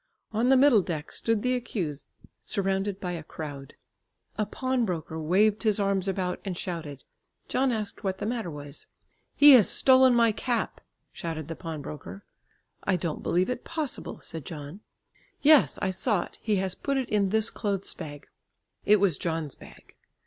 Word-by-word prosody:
On 225 +3 +1
the 265 - +6
middle 260 -5 +6
deck 160 -4 -5
stood 225 -2 0
the 250 0 +2
accused 190 - -3 0.4
surrounded 195 0 -1
by 180 -2 -3
a 170 -2 -4
crowd. 145 -3 -8 0.6
A 215 - -1
pawnbroker 220 - -2
waved 200 +7 +2
his 215 -2 +2
arms 195 -1 +1
about 185 -2 -1
and 185 -3 -4
shouted. 165 -7 -5 0.4
John 265 0 +1
asked 215 -2 -4
what 190 -1 -1
the - - -4
matter 225 -5 -2
was. 145 -2 -6 0.5
"He 290 0 +9
has 245 -7 +7
stolen 260 -1 +5
my 230 -1 +5
cap," 235 +2 -2 0.3
shouted 160 -3 -5
the 165 - -4
pawnbroker. 160 +3 -7 0.6
"I 195 - +2
don't 170 -3 -3
believe 180 +7 +1
it 250 - -4
possible," 315 -5 -4
said 160 -3 -7
John. 150 +4 -8 0.6
"Yes, 300 -1 +6
I 190 - +1
saw 190 0 +1
it; - - -14
he 215 -2 +1
has 190 -1 -1
put 275 +7 -2
it 260 -2 -1
in 205 -2 +1
this 220 +2 +2
clothes 200 -3 -2
bag." 145 -1 -9 0.6
It 210 0 +5
was 190 -6 +2
John's 160 -4 -2
bag. - - -15
195 Hz, 165 wpm, -27 LUFS, 165-230 Hz, 0.6 s, He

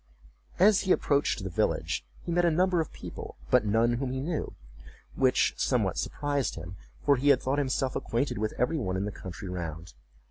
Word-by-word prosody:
As 200 +2 +6
he 190 - 0
approached 140 - +2
the 95 - -3
village - - 0 0.2
he - - -4
met 175 +1 +2
a 170 - +5
number 180 +1 +2
of 160 - -5
people, - - -8
but 105 - +4
none 115 +3 +3
whom 125 +1 -2
he 130 - -2
knew, 155 +3 -3 0.6
which 130 -1 +3
somewhat - - +1
surprised 145 -2 -1
him, 85 +3 -8 0.3
for 140 -2 +5
he 140 +3 +2
had 135 -3 +6
thought 135 +2 0
himself 130 -1 0
acquainted 120 -2 -1
with 110 0 -2
every 140 +6 +1
one 95 -7 -1
in 95 - -1
the 105 - -3
country 95 0 -8
round. 85 -2 -5
130 Hz, 190 wpm, -28 LUFS, 100-145 Hz, 0.6 s, As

